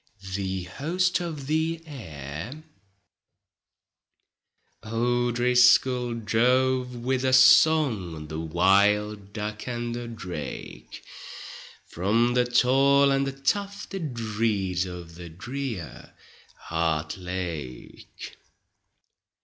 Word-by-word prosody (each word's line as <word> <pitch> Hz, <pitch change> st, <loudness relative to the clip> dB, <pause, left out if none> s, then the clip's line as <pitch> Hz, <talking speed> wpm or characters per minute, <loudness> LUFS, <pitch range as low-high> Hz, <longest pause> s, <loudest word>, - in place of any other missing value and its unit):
THE 95 Hz, -1 st, -2 dB
HOST 170 Hz, -, -1 dB
OF 160 Hz, -6 st, -5 dB
THE 160 Hz, +3 st, 0 dB
AIR 100 Hz, -, -8 dB, 2.2 s
O'Driscoll 120 Hz, +1 st, +3 dB
drove 125 Hz, +3 st, +1 dB
with 125 Hz, +2 st, -1 dB
a 130 Hz, 0 st, +1 dB
song, 125 Hz, -, +4 dB
The 80 Hz, +1 st, -5 dB
wild 100 Hz, +5 st, +2 dB
duck 105 Hz, +2 st, -5 dB
and 120 Hz, -1 st, -3 dB
the 120 Hz, 0 st, -5 dB
drake, 90 Hz, -, -8 dB, 0.9 s
From 115 Hz, +7 st, +1 dB
the 125 Hz, 0 st, +3 dB
tall 135 Hz, +3 st, +4 dB
and 135 Hz, 0 st, +1 dB
the -, -, -2 dB
tufted 175 Hz, -, -3 dB
reeds 105 Hz, -5 st, -1 dB
Of 90 Hz, -2 st, -9 dB
the 85 Hz, 0 st, -10 dB
drear 110 Hz, -, -7 dB, 0.5 s
Hart 80 Hz, 0 st, -2 dB
Lake. 85 Hz, -8 st, -7 dB
115 Hz, 85 wpm, -26 LUFS, 90-130 Hz, 2.2 s, song